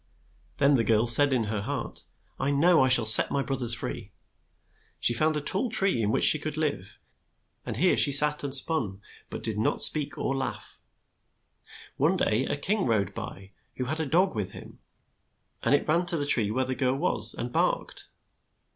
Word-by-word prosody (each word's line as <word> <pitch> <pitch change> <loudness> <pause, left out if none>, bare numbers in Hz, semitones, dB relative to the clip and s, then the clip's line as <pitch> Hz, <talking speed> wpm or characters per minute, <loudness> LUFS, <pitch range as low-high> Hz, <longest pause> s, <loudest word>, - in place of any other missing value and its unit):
Then 140 0 +2
the 120 -4 +1
girl 110 +1 0
said 140 +5 +4
in 125 -3 0
her 105 -1 -4
heart, 140 +6 -7 0.3
"I 135 - -2
know 160 +4 +2
I - - +1
shall 130 -3 +4
set 110 - +6
my 140 - -2
broth 135 -1 -5
ers 120 -1 +1
free." 115 - -8 0.9
She 120 - 0
found 155 +5 -1
a - - -4
tall 195 - 0
tree 195 - 0
in 105 - -2
which - - 0
she 155 - +7
could 155 0 -6
live, 140 -11 -5 0.7
and - - -5
here - - +1
she 140 - +4
sat 150 +2 +5
and 140 - -5
spun, 130 - +1 0.3
but - - -9
did 110 -2 -4
not 110 - 0
speak 150 -2 +3
or 135 - -3
laugh. 135 -1 -7 1.2
One - - 0
day 115 +5 -1
a - - -3
king 190 +5 -2
rode 100 -4 -2
by 95 0 -10 0.2
who 125 - -5
had 155 +5 -5
a 160 - -3
dog 180 +7 0
with 105 -4 -6
him, - - -14 0.8
and - - +2
it - - -3
ran 170 +3 -1
to 175 -1 +3
the 145 - -3
tree 115 -7 +1
where 130 +4 -2
the 130 - -4
girl 130 0 -2
was 155 +6 -1
and 120 +1 -7
barked. - - -3
135 Hz, 200 wpm, -25 LUFS, 115-150 Hz, 1.2 s, she